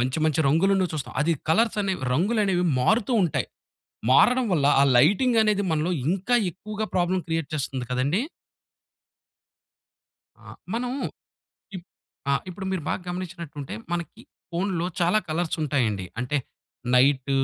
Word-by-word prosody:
మంచి 130 Hz, +4 st, -1 dB
మంచి 155 Hz, 0 st, +2 dB
రంగులున్నవి 185 Hz, +4 st, +2 dB
చూస్తాం. 145 Hz, -3 st, -5 dB
అది 165 Hz, +3 st, +2 dB, 0.2 s
కలర్స్ 215 Hz, +6 st, +2 dB
అనేవి 190 Hz, -4 st, -2 dB
రంగులనేవి 190 Hz, -, +1 dB, 0.2 s
మారుతూ 220 Hz, -, +2 dB
ఉంటాయి. 170 Hz, -6 st, 0 dB, 0.6 s
మారడం 245 Hz, -, +5 dB
వల్ల 145 Hz, -4 st, +2 dB, 0.2 s
ఆ -, -, +6 dB
లైటింగ్ 210 Hz, -, +4 dB
అనేది 210 Hz, -2 st, +2 dB
మనలో 160 Hz, +3 st, 0 dB, 0.2 s
ఇంకా 195 Hz, +7 st, +1 dB, 0.2 s
ఎక్కువగా 210 Hz, +4 st, -5 dB
ప్రాబ్లమ్ 180 Hz, +1 st, +1 dB
క్రియేట్ 165 Hz, -2 st, -1 dB
చేస్తుంది 135 Hz, -3 st, -3 dB
కదండీ. 140 Hz, -, +1 dB, 2.2 s
ఆ! -, -, -17 dB, 0.3 s
మనం 245 Hz, +1 st, -2 dB, 0.9 s
ఇప్ 175 Hz, -, -10 dB, 0.5 s
ఆ! -, -, +3 dB, 0.2 s
ఇప్పుడు 190 Hz, +1 st, -6 dB
మీరు 185 Hz, -4 st, -2 dB
బాగా -, -, -2 dB
గమనించినట్టుంటే 170 Hz, -5 st, -6 dB, 0.2 s
మనకి 170 Hz, -3 st, -4 dB, 0.3 s
ఫోనులో 175 Hz, -1 st, -1 dB
చాలా 175 Hz, +5 st, +3 dB
కలర్స్ 160 Hz, +2 st, -1 dB
ఉంటాయండి. 115 Hz, -10 st, 0 dB
అంటే 125 Hz, +4 st, -1 dB, 0.6 s
నైట్, 135 Hz, +1 st, +3 dB
175 Hz, 125 wpm, -25 LUFS, 145-195 Hz, 2.2 s, ఆ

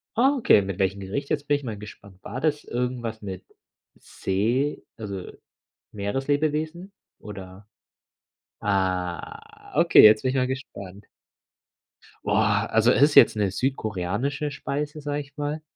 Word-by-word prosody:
Ah, 270 Hz, +5 st, +4 dB
okay. 220 Hz, -, +5 dB
Mit 100 Hz, -1 st, -5 dB
welchem 95 Hz, +1 st, 0 dB
Gericht? 105 Hz, +9 st, -4 dB
Jetzt 145 Hz, -1 st, -2 dB
bin 145 Hz, -, +3 dB
ich 145 Hz, -, -12 dB
mal 110 Hz, -4 st, -5 dB
gespannt. 100 Hz, -2 st, -12 dB
War 125 Hz, +5 st, -6 dB
das 150 Hz, -2 st, 0 dB
irgendwas 120 Hz, -2 st, -3 dB
mit 95 Hz, -3 st, -7 dB, 0.5 s
See 120 Hz, +10 st, -1 dB
also, 100 Hz, -4 st, -6 dB, 0.6 s
Meereslebewesen 150 Hz, -, -2 dB, 0.3 s
oder? 95 Hz, -1 st, -10 dB, 0.9 s
Ah, 95 Hz, -3 st, -3 dB
okay, -, -, +7 dB
jetzt 110 Hz, 0 st, +8 dB
bin 130 Hz, -, 0 dB
ich 135 Hz, -, -2 dB
mal 125 Hz, -1 st, +2 dB
gespannt. 100 Hz, -7 st, -7 dB, 1.2 s
Boah, -, -, +2 dB
also 110 Hz, +2 st, +4 dB
es -, -, +2 dB
ist 145 Hz, 0 st, +4 dB
jetzt -, -, +8 dB
'ne 100 Hz, -3 st, 0 dB
südkoreanische 125 Hz, +4 st, -2 dB
Speise, 150 Hz, +2 st, -4 dB
sage 145 Hz, 0 st, -2 dB
ich 140 Hz, +1 st, -16 dB
mal, 150 Hz, +1 st, -3 dB
120 Hz, 135 wpm, -25 LUFS, 100-145 Hz, 1.2 s, jetzt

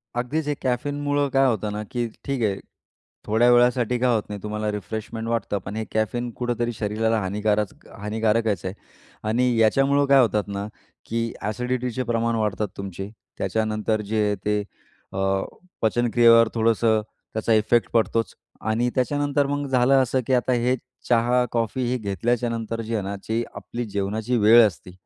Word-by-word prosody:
अगदीच, 140 Hz, +6 st, -2 dB
हे 150 Hz, -, +1 dB
कॅफीनमुळं 145 Hz, +3 st, 0 dB
काय 135 Hz, 0 st, +4 dB
होतं 110 Hz, -3 st, -1 dB
ना, 105 Hz, +1 st, -4 dB
की 120 Hz, -1 st, -1 dB, 0.2 s
ठीक 135 Hz, -4 st, -1 dB
आहे 100 Hz, -2 st, 0 dB, 0.7 s
थोड्या 115 Hz, +3 st, +3 dB
वेळासाठी 120 Hz, 0 st, +3 dB
काय 125 Hz, 0 st, +3 dB
होत 110 Hz, -, 0 dB
नाही 105 Hz, -1 st, -6 dB
तुम्हाला. 105 Hz, 0 st, -2 dB
रिफ्रेशमेंट 110 Hz, +3 st, -5 dB
वाटतं, 115 Hz, -3 st, -1 dB
पण 100 Hz, -, -5 dB
हे 110 Hz, -, -2 dB
कॅफीन 120 Hz, +3 st, -1 dB
कुठतरी 120 Hz, -1 st, -1 dB
शरीराला 110 Hz, +1 st, 0 dB
हानीकारच 105 Hz, +1 st, 0 dB, 0.3 s
हानीकारकच 110 Hz, -2 st, 0 dB
आहे 95 Hz, -, -3 dB, 0.6 s
आणि 125 Hz, +2 st, +2 dB
याच्यामुळं 135 Hz, +6 st, +3 dB
काय 135 Hz, -1 st, +6 dB
होतात 105 Hz, -3 st, +2 dB
ना, 100 Hz, 0 st, -4 dB, 0.4 s
की 115 Hz, 0 st, -2 dB, 0.2 s
एसिडिटीचे 125 Hz, +2 st, -2 dB
प्रमाण 115 Hz, 0 st, +1 dB
वाढतात 105 Hz, -1 st, -1 dB
तुमचे. 95 Hz, 0 st, -6 dB, 0.3 s
त्याच्यानंतर 110 Hz, 0 st, -1 dB
जे 105 Hz, -2 st, +1 dB
ते 105 Hz, 0 st, +1 dB, 0.5 s
अ, 95 Hz, 0 st, 0 dB, 0.4 s
पचनक्रियेवर 115 Hz, 0 st, +5 dB
थोडंसं 115 Hz, -1 st, +2 dB, 0.3 s
त्याचा 110 Hz, +1 st, +1 dB
इफेक्ट 110 Hz, +2 st, +3 dB
पडतोच 115 Hz, 0 st, +1 dB, 0.4 s
आणि 120 Hz, +3 st, +1 dB
त्याच्यानंतर 145 Hz, +2 st, +1 dB
मग 145 Hz, 0 st, -2 dB
झालं 130 Hz, 0 st, +3 dB
असं, 130 Hz, +1 st, 0 dB
की 130 Hz, -, +1 dB
आता 125 Hz, 0 st, +2 dB
हे 125 Hz, +1 st, +2 dB, 0.3 s
चहा, 120 Hz, +1 st, +3 dB
कॉफी 115 Hz, +2 st, -1 dB
हे 125 Hz, -, 0 dB
घेतल्याच्यानंतर 115 Hz, +2 st, -2 dB
जे 115 Hz, +1 st, -5 dB
आहे 105 Hz, -, -1 dB
ना, 100 Hz, +1 st, -4 dB
ते 115 Hz, +1 st, +1 dB
आपली 120 Hz, 0 st, -5 dB
जेवणाची 105 Hz, +5 st, -1 dB
वेळ 115 Hz, +2 st, +7 dB
असते 90 Hz, -1 st, -9 dB
115 Hz, 155 wpm, -24 LUFS, 105-125 Hz, 0.7 s, वेळ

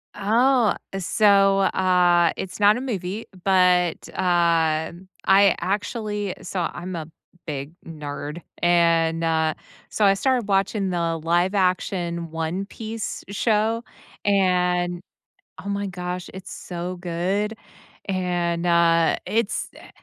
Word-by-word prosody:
Oh, 235 Hz, +3 st, +3 dB, 0.2 s
so, 195 Hz, +1 st, +4 dB
uh, 175 Hz, -2 st, +3 dB
it's 190 Hz, +1 st, -6 dB
not 205 Hz, +2 st, +5 dB
a -, -, -4 dB
movie, 205 Hz, -4 st, -4 dB, 0.2 s
but, 180 Hz, -3 st, +2 dB
uh, 165 Hz, -3 st, +2 dB, 0.3 s
I 195 Hz, 0 st, +5 dB
actually 205 Hz, +1 st, -2 dB
saw 175 Hz, 0 st, -3 dB
I'm 180 Hz, +1 st, -6 dB
a 160 Hz, -2 st, -5 dB, 0.4 s
big 140 Hz, -2 st, -5 dB
nerd, 150 Hz, 0 st, -6 dB, 0.2 s
and, 165 Hz, -1 st, +3 dB
uh, 160 Hz, -1 st, +1 dB, 0.4 s
so 210 Hz, -, +1 dB
I 195 Hz, -, +6 dB
started 250 Hz, 0 st, 0 dB
watching 195 Hz, 0 st, +1 dB
the 170 Hz, -2 st, -1 dB
live 175 Hz, +4 st, +1 dB
action 180 Hz, -3 st, -1 dB
One 165 Hz, +4 st, -3 dB
Piece 220 Hz, +1 st, -6 dB
show, 220 Hz, +2 st, +1 dB, 0.4 s
and 180 Hz, -3 st, +1 dB, 0.6 s
oh, 200 Hz, -, -5 dB
my 200 Hz, 0 st, -2 dB
gosh, 180 Hz, -1 st, -5 dB
it's 190 Hz, 0 st, -9 dB
so 180 Hz, +1 st, -6 dB
good, 185 Hz, +5 st, -2 dB, 0.5 s
and, 175 Hz, -3 st, -1 dB
uh, 170 Hz, -1 st, +3 dB
it's 220 Hz, -1 st, -1 dB
eh, -, -, -14 dB
180 Hz, 115 wpm, -23 LUFS, 170-200 Hz, 0.6 s, I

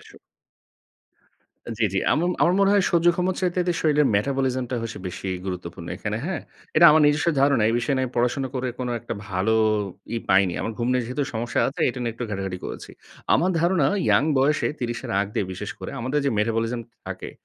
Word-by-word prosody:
এসব। -, -, -17 dB, 1.6 s
জি, 115 Hz, -, +2 dB
জি। -, -, +2 dB
এমন 150 Hz, -, +1 dB
আমার -, -, +1 dB
আমার 175 Hz, -, +4 dB
মনে 195 Hz, 0 st, +4 dB
হয় 205 Hz, -1 st, +4 dB
সহ্য 170 Hz, -1 st, +2 dB
ক্ষমছ 180 Hz, 0 st, 0 dB, 0.2 s
চাইতে 180 Hz, -1 st, +1 dB
শরীরের 150 Hz, -2 st, +3 dB
মেটাবলিজম 130 Hz, +2 st, 0 dB
টা 125 Hz, -, -1 dB
হচ্ছে 115 Hz, -2 st, -5 dB
বেশি 95 Hz, +2 st, -6 dB, 0.2 s
গুরুত্বপূর্ণ 85 Hz, -2 st, -6 dB
এখানে, 105 Hz, 0 st, -3 dB
হ্যাঁ? 175 Hz, -3 st, -2 dB, 0.4 s
এটা 170 Hz, -, +7 dB
আমার 155 Hz, +1 st, +5 dB
নিজস্ব 150 Hz, +3 st, +2 dB
ধারণা। 140 Hz, -5 st, +4 dB
এই 115 Hz, -, +1 dB
বিষয় 130 Hz, +4 st, -1 dB
নিয়ে 130 Hz, 0 st, +1 dB
আমি 125 Hz, -, -10 dB
পড়াশোনা 125 Hz, +3 st, +1 dB
করে 130 Hz, -1 st, -1 dB
কোনো 125 Hz, -1 st, -3 dB
একটা -, -, -5 dB
ভালো 95 Hz, +4 st, +1 dB, 0.6 s
ই -, -, 0 dB
পাইনি। 95 Hz, -2 st, +4 dB
আমার 115 Hz, -, -3 dB
ঘুম 120 Hz, -, -1 dB
নিয়ে 125 Hz, -1 st, +1 dB
যেহেতু 125 Hz, +5 st, -2 dB
সমস্যা 115 Hz, +2 st, -1 dB
আছে 135 Hz, -, -7 dB
এটা 125 Hz, -, -4 dB
নিয়ে 115 Hz, -2 st, -2 dB
একটু 120 Hz, +1 st, -4 dB
ঘাটাঘাটি 95 Hz, -2 st, -3 dB
করেছি। -, -, -7 dB, 0.4 s
আমার 180 Hz, -, +2 dB
ধারণা 170 Hz, -4 st, +3 dB, 0.2 s
ইয়াং -, -, +4 dB, 0.2 s
বয়সে 145 Hz, +3 st, +2 dB
৩০ 120 Hz, -1 st, -3 dB
এর -, -, -5 dB
আগ 100 Hz, -, 0 dB
দিয়ে -, -, 0 dB
বিশেষ 90 Hz, -, -6 dB
করে -, -, -6 dB
আমাদের 130 Hz, +5 st, -1 dB
যে 140 Hz, -, +2 dB
মেটাবলিজম 115 Hz, +2 st, 0 dB, 0.3 s
থাকে, -, -, -6 dB
125 Hz, 205 wpm, -24 LUFS, 110-150 Hz, 1.6 s, এটা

